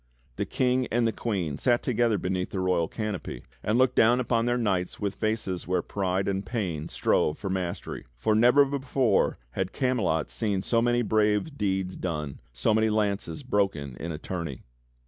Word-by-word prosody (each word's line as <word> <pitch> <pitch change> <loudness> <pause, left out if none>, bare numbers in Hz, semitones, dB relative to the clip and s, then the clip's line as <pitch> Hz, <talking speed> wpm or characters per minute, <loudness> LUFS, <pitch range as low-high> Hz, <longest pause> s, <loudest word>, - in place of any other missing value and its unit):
The - - -1
King 130 0 +1
and 120 0 +1
the 115 - +2
Queen 90 -12 -2
sat 120 -2 +2
together 120 -3 +2
beneath 90 -1 -2
the 95 - -3
royal 90 -3 +1
canopy, 105 - -4 0.2
and 110 +2 +1
looked 130 0 +4
down 120 +3 +5
upon 120 -1 +1
their 120 0 +2
knights 95 -6 -1
with 100 -2 -1
faces 110 -6 -2
where 90 -1 +1
pride 95 -1 -1
and 95 0 -1
pain 95 -8 -3
strove 75 - +1
for 95 -1 -4
mastery; 90 -2 -4
for 110 - +1
never 125 +6 +6
before 135 -5 +1
had 95 +8 -3
Camelot 125 - 0
seen 100 -4 -1
so 115 +1 +2
many 120 0 +2
brave 105 +6 +1
deeds 95 -4 -1
done, 75 -6 -4
so - - +1
many 110 0 +3
lances 105 +6 -1
broken 95 - 0
in 85 - -4
a 75 - -4
tourney. 80 -6 -5
105 Hz, 175 wpm, -27 LUFS, 90-120 Hz, 0.2 s, never